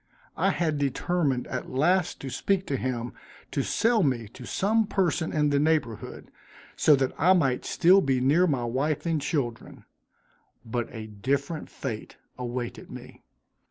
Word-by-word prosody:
I - - +2
had 155 -4 0
determined 140 -1 0
at 130 - -5
last 175 +7 +1
to 135 - -5
speak 195 +5 0
to 140 - -2
him 120 -2 -3 0.4
to - - 0
sell 230 0 +2
me 125 - 0
to 125 +3 -11
some 220 +2 +1
person 175 -5 0
in 150 -1 +1
the 140 - +3
neighborhood, 150 -7 -1 0.4
so 150 - +5
that 135 -1 0
I 180 +5 +6
might 135 -9 +1
still 185 +3 +5
be 135 -4 +1
near 150 +8 +4
my 135 -6 0
wife 135 +7 -1
and 165 -3 0
children 135 -7 -3 0.8
but 120 0 -3
a 110 -2 -7
different 140 +9 -2
fate 115 -6 -6 0.2
awaited 120 -1 -5
me. - - -11
140 Hz, 155 wpm, -27 LUFS, 125-170 Hz, 0.8 s, I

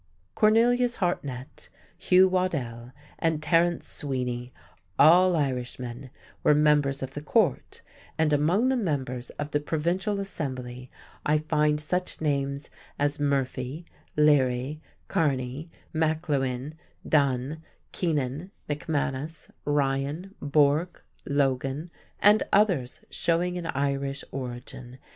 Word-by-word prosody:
Cornelius 240 +3 +4
Hartnett, 140 - -3 0.3
Hugh 185 +1 +5
Waddell, 130 -11 -2 0.3
and 160 -2 +1
Terence 165 +2 +2
Sweeny, 125 -3 -3 0.5
all 175 +4 +6
Irishmen, 125 -2 -3 0.3
were 150 - +5
members 145 -2 +3
of 130 0 -6
the 145 - -5
Court, 150 - 0 0.3
and 160 -1 +2
among 175 - +3
the 265 - +2
members 135 - -2
of 145 0 -4
the 145 - +2
provincial 175 +7 -1
assembly 130 -9 -5 0.3
I 150 +1 +3
find 150 -1 +1
such 180 +4 -2
names 140 -2 -1 0.3
as 145 +1 0
Murphy, 140 +1 -1 0.3
Leary, 145 -1 +3 0.3
Kearney, 135 0 -1 0.2
McLewean, 150 -4 0 0.3
Dunn, 140 +1 +1 0.3
Keenan, 150 0 -1 0.2
McManus, 150 0 -3
Ryan, 145 +5 -1
Bourke, 145 +4 +2 0.2
Logan, 140 +3 0 0.3
and 210 +1 +6
others 180 - +2
showing 175 +1 +1
an 175 -2 -4
Irish 140 -1 -1
origin. 125 -1 -7
145 Hz, 105 wpm, -27 LUFS, 135-165 Hz, 0.5 s, all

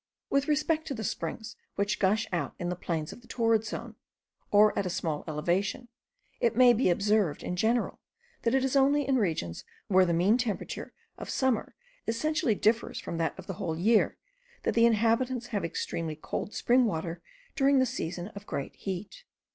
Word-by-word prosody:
With 275 0 +2
respect 310 +1 +1
to 275 - -3
the 220 - -5
springs 215 +5 -4 0.2
which 200 +1 0
gush 210 +3 +2
out 175 - -2
in 175 - -3
the 180 - -1
plains 165 -3 -3
of - - -14
the 240 - -19
torrid 225 -2 +2
zone, - - -6 0.5
or 210 +1 +5
at 200 - 0
a - - -2
small 160 -3 -2
elevation, 175 +10 -1 0.5
it 235 -1 +2
may 250 0 +7
be 235 -3 +2
observed, 200 -3 +1
in 180 - -3
general, 230 +6 +1 0.4
that 235 +2 +1
it 265 0 +2
is 265 - -1
only 280 +1 +4
in 270 -1 +3
regions 160 - -1 0.3
where 190 -1 +6
the - - +1
mean 185 +8 +3
temperature 230 -5 -3 0.3
of - - -7
summer 260 -4 0 0.3
essentially 255 0 +1
differs 225 +3 +1
from 170 - -5
that 165 - -1
of 190 - -9
the 190 - -4
whole 160 -1 -2
year, 215 +6 +3 0.5
that - - +1
the 230 0 +5
inhabitants 235 +2 +1
have 205 - 0
extremely 165 -1 -3
cold 160 +6 -5
spring 250 +1 +4
water 165 -4 -3 0.3
during 275 0 +4
the 260 - +4
season 180 -6 -4
of 200 -1 -11
great 140 - -4
heat. 195 - -6
215 Hz, 185 wpm, -29 LUFS, 180-245 Hz, 0.5 s, may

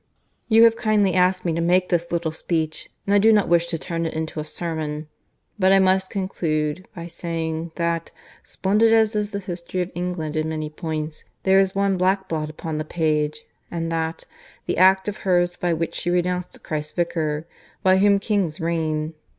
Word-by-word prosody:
"You 225 0 +6
have 230 -1 +6
kindly 210 -4 +2
asked 185 0 +2
me 170 - +1
to 170 - -1
make 180 +2 +2
this 170 -1 0
little 170 -2 -1
speech, 160 -1 -2 0.2
and 200 - +1
I 205 - +6
do 220 +2 +6
not 210 -3 +4
wish 170 0 +3
to 170 - -2
turn 165 0 -3
it 160 - -6
into 160 0 -3
a - - -2
sermon, 155 -1 -4 0.5
but 190 0 +4
I 195 - +7
must 190 0 +3
conclude 165 -3 -2
by 170 -1 -6
saying 165 -1 -4
that, 170 -1 -1 0.3
splendid 215 +4 +2
as 220 -1 +3
is 210 -1 0
the 205 - -4
history 185 -2 -5
of 180 - -9
England 175 -3 -3
in 155 0 0
many 155 -1 -4
points, 155 -1 -4 0.2
there 190 0 +5
is 190 -1 +1
one 195 -1 +2
black 190 +1 +1
blot 155 -3 -2
upon 155 0 -5
the - - -1
page, 155 -2 0 0.3
and 165 -1 -3
that, 160 0 -2 0.4
the - - -1
act 190 +1 +5
of 210 - -3
hers 175 -2 +1
by 175 - -1
which 165 0 -1
she 175 - -2
renounced 180 0 -1
Christ's 150 -1 -4
Vicar, 160 -3 -1 0.4
by 185 0 +5
whom 200 0 +5
kings 195 -6 -1
reign. 160 -2 -1
170 Hz, 190 wpm, -23 LUFS, 160-190 Hz, 0.5 s, I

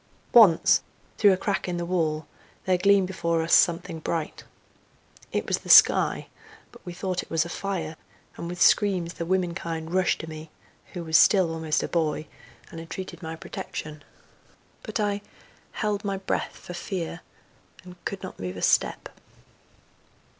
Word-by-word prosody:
Once, 210 -9 +6 0.4
through 205 -2 +6
a 185 - +2
crack 195 0 -2
in 175 -1 -2
the 175 - -3
wall, 160 -4 -1 0.4
there 185 - +3
gleamed 195 +1 +4
before 170 -3 -1
us 165 - -1
something 165 -1 +3
bright. 160 0 -4 0.9
It - - -1
was - - 0
the - - -12
sky, - - +6 0.5
but - - -17
we 175 - -7
thought 180 +1 -3
it - - -14
was 165 0 +1
a - - -7
fire, 170 -4 -4 0.4
and 170 - -6
with 175 0 -6
screams 185 -5 +3
the 170 - -5
womenkind 170 -3 -2
rushed 185 -1 +2
to 165 - -8
me, 155 0 -9 0.4
who 175 - -5
was 160 -1 +4
still 185 -5 +4
almost 160 -1 -1
a - - -2
boy, 155 -2 -1 0.5
and 165 - -8
entreated 185 +4 -8
my 160 -1 -6
protection. 150 -1 -7 0.8
But 265 - -5
I—held 205 0 -4
my 200 -1 -2
breath 190 - -3
for 175 - -10
fear, 175 -2 -5 0.6
and 180 0 -12
could 195 -1 -5
not 185 - -8
move 90 0 -5
a - - -6
step. - - +2
175 Hz, 160 wpm, -26 LUFS, 160-190 Hz, 0.9 s, Once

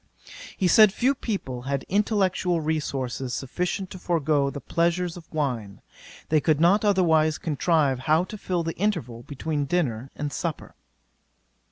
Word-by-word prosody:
'He 185 - +2
said 215 +3 +7
few 250 +7 +2
people 190 - -4
had 135 +1 -3
intellectual 190 -3 +1
resources 135 -5 -2
sufficient 180 +7 -3
to 185 - -8
forego 155 -5 +1
the 140 - -6
pleasures 170 +3 0
of 170 -3 -13
wine. 125 -10 -3 0.5
They 155 -1 +3
could 155 -2 +2
not 185 +6 +4
otherwise 160 -6 +3
contrive 150 -3 +1
how 155 +5 +2
to 215 +3 -8
fill 180 -3 -1
the 165 0 -4
interval 165 - -2
between 145 +2 -3
dinner 135 -7 -1
and 145 -1 -4
supper. 165 -4 -4
160 Hz, 145 wpm, -25 LUFS, 140-180 Hz, 0.5 s, said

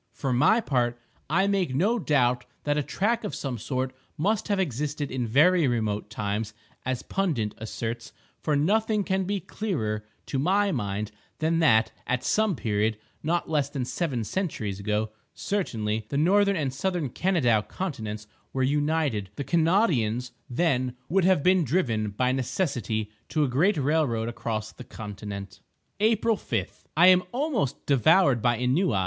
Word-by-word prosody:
For 135 -3 -2
my 150 - +4
part, 120 - 0 0.3
I 185 +6 +3
make 195 -9 0
no 210 - +2
doubt 125 - +2 0.2
that 145 0 +1
a 150 - +1
track 215 - 0
of 210 - -4
some 130 -4 -4
sort 130 +3 -2 0.2
must 200 +7 0
have 205 -2 +1
existed 145 -2 -2
in 125 -2 -2
very 155 +7 +4
remote 110 -4 -1
times, 105 0 -3 0.3
as 130 -1 -2
Pundit 145 - -1
asserts; 115 +2 -5 0.3
for 150 - +1
nothing 210 +7 +2
can 190 -1 0
be 200 +1 -1
clearer, 110 - -3 0.2
to 135 - -2
my 195 +7 +2
mind, 105 - -2 0.3
than 160 +1 +1
that, 110 -8 +4 0.2
at 125 -1 0
some 215 -4 +2
period—not 110 +10 -1
less 150 -3 0
than 135 -4 -3
seven 130 -4 -2
centuries 110 - -3
ago, 105 +1 -1 0.2
certainly—the 110 - -2
Northern 200 +6 +4
and 140 -6 -1
Southern 175 0 -1
Kanadaw 125 - +2
continents 110 - -4 0.3
were 130 - 0
united; 145 -7 0
the 140 - -3
Kanawdians, 150 - +2 0.2
then, 130 -3 +1
would 185 +2 +3
have 185 -6 +4
been 185 -1 +4
driven, 120 - 0
by 125 +5 0
necessity, 120 - -1 0.2
to 155 - +1
a - - +2
great 160 +11 +2
railroad 135 -6 +1
across 115 -2 -4
the 125 - -11
continent. 100 -4 -7 0.4
April 220 +1 +3
5.—I 110 - 0
am 185 0 +7
almost 250 - -1
devoured 140 - +4
by 120 +1 +2
ennui. 125 - +1
135 Hz, 150 wpm, -26 LUFS, 115-180 Hz, 0.4 s, am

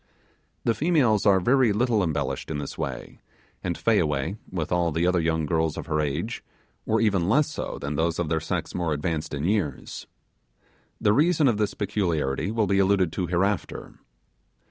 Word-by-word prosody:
The 115 - +2
females 130 - +2
are 95 -2 +5
very 125 +3 +3
little 110 +1 +2
embellished 80 -5 -2
in 80 - -2
this 70 -1 -5
way, - - -6 0.4
and 85 -2 -2
Fayaway, 80 -6 +1 0.2
and 85 -4 -3
all 85 -1 +1
the 80 +3 0
other 90 0 +2
young 80 -1 0
girls 80 0 0
of - - -5
her 75 -1 0
age, 75 +11 -3 0.4
were 110 - +2
even 100 -5 +2
less 150 +6 +3
so - - -5
than 70 +1 -4
those 85 +1 0
of 85 - -1
their 80 +1 0
sex - - -3
more 85 -3 -1
advanced 75 +1 -2
in 70 -1 -3
years. 90 -7 -2 0.9
The 105 - +3
reason 155 +3 +3
of 115 -4 +2
this 105 -1 -1
peculiarity 85 -7 -1
will 110 0 +1
be 100 0 +2
alluded 95 -3 +3
to 90 - -2
hereafter. 95 +3 -2
90 Hz, 175 wpm, -25 LUFS, 80-110 Hz, 0.9 s, are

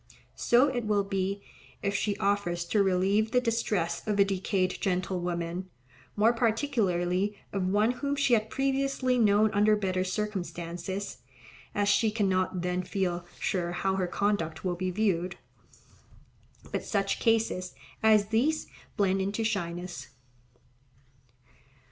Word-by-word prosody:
So 245 +4 +4
it 245 -4 -2
will 205 -1 +2
be, 195 0 -2 0.4
if 200 0 0
she 200 0 -1
offers 195 -4 0
to 205 +4 +2
relieve 195 +3 +2
the 250 +1 +3
distress 210 -8 -1
of 210 -1 0
a 200 - +6
decayed 190 -1 -1
gentlewoman, 180 -1 -2 0.5
more 220 +3 +4
particularly 210 -6 0 0.2
of 190 -2 0
one 210 +4 +3
whom 280 +3 -2
she 275 -3 +2
had 220 -1 +2
previously 270 -1 0
known 210 -1 +4
under 210 +1 +4
better 185 -3 0
circumstances, 185 -1 -4 0.6
as 205 0 +1
she 215 +2 +4
cannot 185 -4 0
then 180 0 0
feel 180 -2 -2
sure 175 -2 -1
how 190 +2 0
her 185 -2 0
conduct 175 -3 -1
will 180 - +1
be 185 +1 -2
viewed. 180 -3 0 1.4
But - - -2
such 195 -2 -1
cases 220 -5 +1 0.3
as 215 -2 +4
these 270 +8 +1 0.3
blend 195 -2 +2
into 200 +4 -1
shyness. 175 -8 -3
200 Hz, 130 wpm, -29 LUFS, 180-220 Hz, 1.4 s, a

